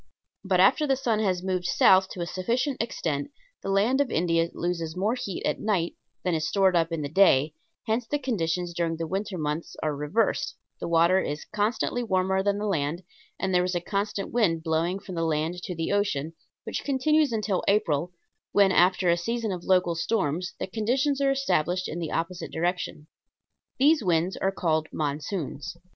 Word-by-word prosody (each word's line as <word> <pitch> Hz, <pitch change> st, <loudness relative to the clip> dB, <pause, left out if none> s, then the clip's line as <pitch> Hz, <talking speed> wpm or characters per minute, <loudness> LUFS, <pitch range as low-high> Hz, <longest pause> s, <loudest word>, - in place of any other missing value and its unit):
But 190 Hz, -2 st, +1 dB
after 260 Hz, +11 st, +5 dB
the 270 Hz, -, +3 dB
sun 235 Hz, -5 st, 0 dB
has 185 Hz, -4 st, 0 dB
moved 185 Hz, -1 st, -1 dB
south 190 Hz, +1 st, +5 dB
to 180 Hz, -, -6 dB
a -, -, -1 dB
sufficient 235 Hz, -, -1 dB
extent 155 Hz, -10 st, -2 dB, 0.3 s
the -, -, -5 dB
land 215 Hz, +8 st, +3 dB
of 280 Hz, -, 0 dB
India 165 Hz, -1 st, +1 dB
loses 170 Hz, -2 st, -3 dB
more 205 Hz, +5 st, +1 dB
heat 200 Hz, -7 st, -4 dB
at -, -, 0 dB
night 195 Hz, -6 st, 0 dB, 0.3 s
than 180 Hz, -, 0 dB
is 155 Hz, -1 st, 0 dB
stored 190 Hz, -2 st, +3 dB
up 165 Hz, -1 st, +2 dB
in 165 Hz, -2 st, -2 dB
the -, -, -2 dB
day; 155 Hz, -3 st, +4 dB, 0.3 s
hence 225 Hz, +2 st, -1 dB
the 290 Hz, -, 0 dB
conditions 180 Hz, -, -2 dB
during 170 Hz, -1 st, -1 dB
the 165 Hz, -, -3 dB
winter 190 Hz, +2 st, -3 dB
months 150 Hz, +1 st, -3 dB
are 155 Hz, -2 st, 0 dB
reversed, 150 Hz, +11 st, 0 dB, 0.2 s
the -, -, -4 dB
water 170 Hz, +2 st, +4 dB
is 150 Hz, -4 st, -3 dB
constantly 215 Hz, +3 st, -1 dB
warmer 190 Hz, -3 st, +1 dB
than 200 Hz, +1 st, +1 dB
the 210 Hz, -, -3 dB
land, 165 Hz, -2 st, -1 dB, 0.4 s
and 190 Hz, 0 st, -1 dB
there 180 Hz, 0 st, +4 dB
is 180 Hz, 0 st, -1 dB
a -, -, +2 dB
constant 200 Hz, +2 st, -3 dB
wind 170 Hz, -9 st, +1 dB
blowing 165 Hz, +3 st, 0 dB
from 195 Hz, -1 st, -9 dB
the 165 Hz, -1 st, -1 dB
land 160 Hz, +2 st, -1 dB
to 180 Hz, -, -5 dB
the 165 Hz, 0 st, -2 dB
ocean, 200 Hz, -7 st, 0 dB, 0.3 s
which -, -, -4 dB
continues 295 Hz, +1 st, +2 dB
until 215 Hz, -4 st, -1 dB
April, 175 Hz, -5 st, +1 dB, 0.4 s
when 200 Hz, -2 st, +5 dB
after 185 Hz, +1 st, +3 dB
a -, -, +4 dB
season 230 Hz, +4 st, -2 dB
of 180 Hz, -2 st, -5 dB
local 180 Hz, -2 st, +3 dB
storms 170 Hz, -1 st, -1 dB
the -, -, -1 dB
conditions 255 Hz, +8 st, 0 dB
are 275 Hz, -, +3 dB
established 185 Hz, -, 0 dB
in 170 Hz, -, -5 dB
the 165 Hz, -3 st, -4 dB
opposite 170 Hz, +2 st, -3 dB
direction. 175 Hz, -2 st, -2 dB, 0.7 s
These 295 Hz, +1 st, +4 dB
winds 175 Hz, 0 st, +1 dB
are 195 Hz, -, 0 dB
called 160 Hz, -4 st, 0 dB
"monsoons." 155 Hz, +2 st, -4 dB
185 Hz, 185 wpm, -26 LUFS, 165-210 Hz, 0.7 s, after